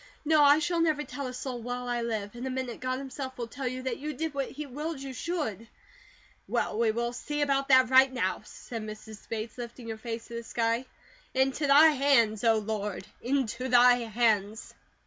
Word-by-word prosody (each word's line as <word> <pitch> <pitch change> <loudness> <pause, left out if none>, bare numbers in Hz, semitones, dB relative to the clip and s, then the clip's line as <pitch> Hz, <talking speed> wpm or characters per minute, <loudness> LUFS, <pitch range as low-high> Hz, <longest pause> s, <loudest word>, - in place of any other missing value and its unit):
No! 310 0 +5
I 290 0 +7
shall 335 +2 0
never 310 -3 +2
tell 275 0 -6
a 250 - -6
soul 250 -1 -5
while 245 +1 -4
I 240 -1 -1
live. 215 -3 -3
In 245 +2 -5
a - - -2
minute 255 -2 -4
God 255 0 -2
himself 265 -1 -6
will 240 - -3
tell 255 +3 -5
you 255 +1 -4
that 260 -3 -3
you 300 +2 -4
did 320 +2 -3
what 275 -1 -2
He 300 +2 -6
willed 295 +3 -5
you 270 -1 -6
should." 240 - -3 0.8
"Well, 215 - -1
we 230 -1 +3
will 235 +2 -1
see 295 +4 -2
about 275 -1 +1
that 260 -1 +5
right 260 0 +7
now," 225 -8 -1
said 230 +1 -8
Mrs. 215 0 -10
Bates, 225 +2 -5
lifting 235 0 -7
her 220 - -4
face 230 0 -5
to - - -12
the 235 0 -5
sky. 230 +2 -1 0.5
"Into 270 +3 +1
thy 295 +3 +8
hands, 260 -7 +3
O 225 -1 +4
Lord, 210 -2 -3 0.2
into 255 -1 -1
thy 245 0 +6
hands!" 220 -2 0
250 Hz, 205 wpm, -29 LUFS, 230-275 Hz, 0.8 s, thy